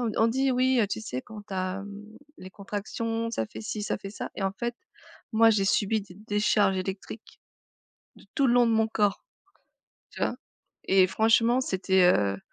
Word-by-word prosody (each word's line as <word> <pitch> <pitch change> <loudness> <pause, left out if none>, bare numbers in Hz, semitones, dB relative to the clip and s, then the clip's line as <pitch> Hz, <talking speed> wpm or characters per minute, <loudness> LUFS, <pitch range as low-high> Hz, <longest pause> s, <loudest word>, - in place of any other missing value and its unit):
on 235 -3 0
on 225 - +4
dit: 265 +3 +1
«Oui, 255 0 +2
heu, 210 - +2
tu 220 - -3
sais 130 -13 -5
quand 215 -1 -11
tu 195 - -7
as 185 +1 -3 0.5
les 185 - -11
contractions, 225 +3 -4
ça 110 - -2
fait 110 - -10
ci 210 - -5
ça - - -2
fait 195 0 -8
ça». - - -6
Et 195 - -5
en 195 0 0
fait 240 +3 -4 0.6
moi 225 +1 +6
j'ai 205 -3 +2
subi 210 +2 +1
des 195 -3 -13
décharges 205 -1 +2
électriques. 190 +4 -6 0.8
De - - -17
tout 275 -2 +3
le 240 - +3
long 245 -1 +5
de 230 - +2
mon 220 0 +2
corps. 205 -2 0 0.9
Tu - - -11
vois? - - 0 0.5
Et 190 -1 +4
franchement 230 +5 +3
c'était, 190 -4 +2
heu, 100 -1 0
210 Hz, 190 wpm, -27 LUFS, 190-230 Hz, 0.9 s, moi